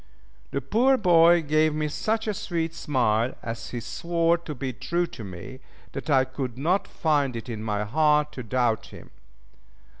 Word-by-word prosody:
The 140 - -2
poor 245 - +3
boy 170 -3 +5
gave 155 +1 +2
me 155 0 0
such 220 +8 -1
a 215 - 0
sweet 175 -6 -3
smile 125 -7 0
as 115 0 -5
he 120 - -4
swore 170 +7 0
to 155 -3 -7
be 130 0 -4
true 170 +8 -1
to 120 - -9
me, 100 +7 -9 0.3
that 135 +3 -6
I 135 -2 +4
could 130 -2 -5
not 175 +8 +1
find 145 -5 0
it 115 - -6
in 115 -3 -5
my 105 -1 -1
heart 150 +5 +2
to 130 - -7
doubt 120 -1 0
him. - - -13
145 Hz, 175 wpm, -26 LUFS, 125-165 Hz, 0.3 s, boy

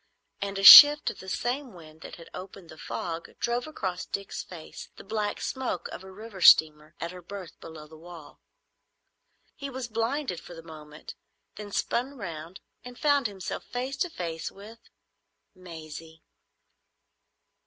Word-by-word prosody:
and 200 0 -4
a 195 - -4
shift 295 +8 +11
of - - -15
the 190 - -9
same 250 +5 -3
wind 160 -2 -15
that - - -10
had 165 - -14
opened 185 -2 -11
the 160 - -13
fog 165 -1 -6
drove 240 +2 -2
across 185 -12 -5
Dick's 200 -1 -6
face 170 -4 -11
the - - -13
black 210 0 -3
smoke 260 -9 -4
of - - -9
a 190 - -12
river 205 0 -11
steamer 155 -1 +5
at 170 - -5
her 180 0 -11
berth 185 0 -10
below 160 -2 -11
the 155 +1 -16
wall. 170 -2 -14 1.1
He 280 - -7
was 260 -2 -6
blinded 230 - -3
for 175 - -13
the 165 - -12
moment, 155 -2 -12 0.4
then 205 -1 -9
spun 260 +7 -2
round 170 -3 -8 0.2
and 250 0 -11
found 285 -4 +2
himself 195 -2 -7
face 255 +2 -5
to 360 - -1
face 165 - -5
with—Maisie. 170 -6 -14
190 Hz, 155 wpm, -27 LUFS, 165-235 Hz, 1.1 s, shift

